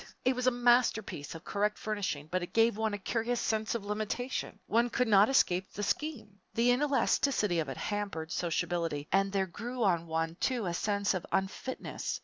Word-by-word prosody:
It 255 0 +3
was 250 0 -1
a - - +6
masterpiece 240 - +2
of 165 - -9
correct 210 +1 0
furnishing, 200 -9 -3
but 185 0 0
it 175 - -6
gave 225 -1 +4
one 220 -1 -1
a - - -4
curious 230 +4 -1
sense 220 +1 0
of 215 -3 -4
limitation. 215 +3 -3
One 235 +3 +2
could 250 +1 +1
not 205 +1 +6
escape 190 -8 +2
the 205 - -4
scheme. 220 -5 -3 0.2
The 235 +2 +4
inelasticity 260 - +2
of 155 -4 -2
it 135 - -5
hampered 200 -6 -3
sociability 165 -3 -1
and 195 +1 +3
there 195 -1 +1
grew 235 +7 -4
on 170 -4 +2
one, 165 +1 -2
too, 245 -5 0
a 175 - -1
sense 200 +3 0
of 185 -2 -2
unfitness. 195 +7 -3
205 Hz, 185 wpm, -31 LUFS, 180-240 Hz, 0.2 s, a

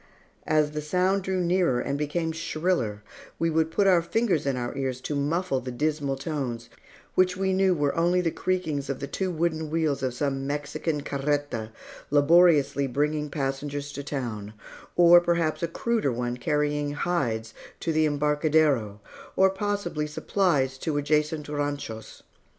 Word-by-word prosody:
As 155 -1 +2
the 150 0 -3
sound 180 +6 +1
drew 190 0 -1
nearer 175 -7 +2
and 140 +3 -2
became 155 +3 -1
shriller, 155 - -1 0.3
we 165 0 +1
would 160 0 +2
put 200 +5 +1
our 180 -3 +5
fingers 180 -4 0
in 135 -2 0
our 120 +1 -3
ears 130 -2 -2
to 150 - -4
muffle 145 +1 0
the 130 - -6
dismal 145 +1 -1
tones, 130 -5 -4 0.4
which 185 0 +2
we 190 0 +1
knew 190 -1 +3
were 145 -3 0
only 175 +2 +2
the 170 -2 0
creakings 160 -7 -2
of 135 - -2
the - - -3
two 185 +6 -2
wooden 160 -2 -1
wheels 155 -3 0
of 130 -2 -2
some 135 0 -2
Mexican 145 +1 -2
carreta, 140 -5 -2 0.4
laboriously 145 -2 +4
bringing 150 +3 -1
passengers 145 +1 -3
to 140 - -6
town, 115 -8 -4 0.4
or 175 0 +8
perhaps 170 -2 0
a 170 - 0
cruder 220 - 0
one 120 0 -2
carrying 145 +3 0
hides 125 -10 -1 0.3
to 165 - -1
the 155 0 +3
embarcadero, 150 -7 +1 0.4
or 190 0 +5
possibly 195 -6 -2
supplies 150 -5 0
to 150 0 -2
adjacent 150 +1 0
ranchos. 145 -7 -4
150 Hz, 155 wpm, -26 LUFS, 140-170 Hz, 0.4 s, or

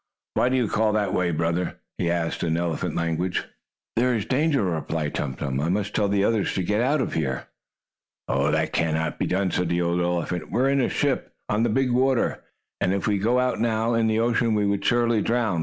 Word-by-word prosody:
"Why 125 - +2
do 130 - +1
you 125 -3 +2
call 110 +1 +1
that 105 -3 0
way, 90 -3 +1
brother?" 85 +2 -1 0.2
he 85 - +1
asked 85 -1 -1
in 80 -1 0
elephant 85 -3 -2
language. 85 +2 -1 0.5
"There 125 +1 +2
is 110 -2 -2
danger," 140 +1 +1
replied 80 -3 -2
Tum 65 -3 -2
Tum. 65 -2 -3
"I 75 +4 0
must 100 +2 -1
tell 105 - +2
the 100 0 +1
others 110 -1 +1
to 95 - 0
get 105 +4 +1
out 140 +3 +2
of - - -2
here." 65 -5 -2 0.8
"That - - +1
cannot 80 0 0
be - - 0
done," 95 0 0
said 90 0 0
the 85 0 +1
old 85 +1 0
elephant. 85 -1 -2
"We - - 0
are 135 +2 +3
in 140 -1 +2
a 120 - +1
ship, - - -1
on 105 - +1
the 120 - +2
big 130 +2 +1
water, 130 0 +1 0.4
and 95 - +1
if 100 - -2
we 105 -2 +1
got 115 +5 +2
out 125 0 +1
now, 115 0 +1
in 115 -1 +2
the 110 0 +1
ocean, 115 -1 +2
we 105 -1 +2
would 100 0 0
surely 120 -2 +2
drown. 115 -6 0
100 Hz, 225 wpm, -24 LUFS, 85-120 Hz, 0.8 s, are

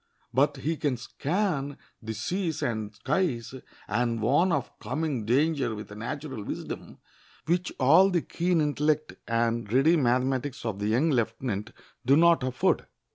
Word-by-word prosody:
But 140 +3 +3
he 160 +2 -2
can 140 -4 0
scan 145 - -2 0.2
the 110 -1 -5
seas 170 - -2
and 110 -3 -2
skies 135 -5 -1 0.3
and 115 +2 0
warn 145 - +3
of 145 -6 -1
coming 130 -1 -2
danger 140 -1 +2
with 105 0 -8
a - - -8
natural 130 +2 -5
wisdom - - -6 0.5
which 175 +2 0
all 160 +9 +6
the 175 -4 +1
keen 175 -1 0
intellect 150 +1 0
and 115 -2 0
ready 135 +7 +5
mathematics 130 0 0
of 105 -3 -3
the 105 - -1
young 130 +9 +2
lieutenant 115 -3 -1 0.3
do 135 +4 +5
not 170 -1 +5
afford. 130 0 0
135 Hz, 145 wpm, -27 LUFS, 115-155 Hz, 0.5 s, all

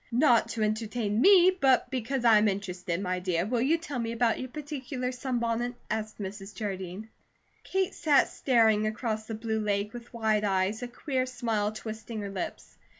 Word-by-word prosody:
"Not 235 -2 +4
to 225 -2 -2
entertain 215 0 -1
me, 375 +1 +7
but 265 0 +3
because 255 0 -2
I 220 -2 +7
am 215 - +3
interested, 180 -3 -2
my 185 -2 -1
dear, 180 -1 0
will 235 +2 0
you 300 +7 +3
tell 290 -6 -5
me 230 -1 -2
about 235 -1 +1
your 255 - -4
particular 265 -3 -4
sunbonnet?" 245 -1 -2 0.2
asked 215 0 -3
Mrs. 195 0 -7
Jardine. 190 0 -5 0.6
Kate 380 -1 -1
sat 300 -4 +3
staring 220 -4 +3
across 215 -1 -3
the 225 - -4
blue 220 0 -2
lake 205 0 -1
with 240 0 -9
wide 220 -2 +1
eyes, 195 +2 0
a 245 - -3
queer 255 +1 -2
smile 225 -4 -1
twisting 220 0 -6
her 200 -1 -5
lips. 190 -2 -6
225 Hz, 175 wpm, -28 LUFS, 210-250 Hz, 0.6 s, me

